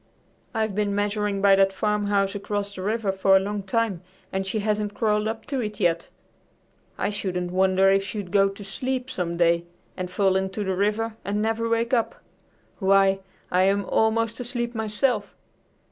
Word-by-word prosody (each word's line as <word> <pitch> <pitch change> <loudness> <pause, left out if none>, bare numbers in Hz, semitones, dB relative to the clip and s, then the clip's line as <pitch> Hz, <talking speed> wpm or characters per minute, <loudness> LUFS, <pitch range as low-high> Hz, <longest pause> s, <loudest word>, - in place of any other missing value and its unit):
I've 220 -2 0
been 205 0 0
measuring 205 -1 -1
by 200 -1 +7
that 195 0 +4
farmhouse 205 -1 0
across 205 0 -3
the 185 - -7
river 210 +1 0
for 190 0 +3
a - - +7
long 205 +1 -3
time, 200 -2 -1 0.3
and 190 0 -1
she 205 - -1
hasn't 210 -1 -1
crawled 210 -1 +1
up 220 0 -4
to 275 -2 -2
it 210 -3 -4
yet! 170 -1 +1 0.9
I - - -1
shouldn't 180 -3 -3
wonder 190 +1 +3
if 195 0 +3
she'd 195 -2 -6
go 195 0 +4
to 195 +1 -9
sleep 255 +5 -3
some 170 -2 -3
day 170 0 +3 0.3
and 180 -1 -4
fall 190 +1 +2
into 190 +2 -1
the 190 -1 -1
river 215 +3 0
and 205 +1 -1
never 225 +1 0
wake 230 +2 0
up! 230 -3 +1 0.6
Why, 195 -1 +4 0.3
I 180 - +3
am 200 +1 +2
almost 225 +2 +1
asleep 240 -1 -3
myself." 220 0 -1
205 Hz, 175 wpm, -25 LUFS, 195-220 Hz, 0.9 s, by